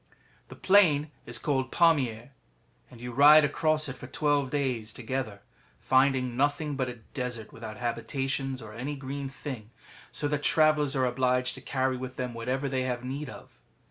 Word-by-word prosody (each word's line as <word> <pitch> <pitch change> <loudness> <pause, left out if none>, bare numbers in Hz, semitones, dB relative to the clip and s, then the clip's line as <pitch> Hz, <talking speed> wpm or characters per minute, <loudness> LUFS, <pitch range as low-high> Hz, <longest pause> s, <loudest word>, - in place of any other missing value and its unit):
] - - -33
The - - -10
plain 160 -7 +4 0.2
is - - -2
called 135 -4 -1
Pamier, 135 -9 +2 0.6
and 120 - -14
you 125 +1 -6
ride 150 +4 +8
across 155 +1 +1
it 135 - -5
for 130 - -10
twelve 145 0 +1
days 125 -6 -2
together, 120 -4 -4 0.4
finding 130 -2 +2
nothing 145 +2 0
but 130 -2 -1
a 120 - -6 0.2
desert 125 -5 -5
without 110 -1 -8
habitations 130 +2 -2
or 105 -1 -10
any 130 +6 -4
green 135 0 -5
thing, 135 -6 -7 0.4
so 145 - -1
that 150 0 -1
travellers 155 -2 +3
are 130 -1 +2
obliged 125 0 +1
to - - -10
carry 130 -1 -1
with 130 0 -6
them 125 -1 -4
whatever 130 +4 -2
they 130 -1 -1
have 125 -1 -2
need 135 +2 -4
of. - - -13
130 Hz, 175 wpm, -28 LUFS, 125-145 Hz, 0.6 s, ride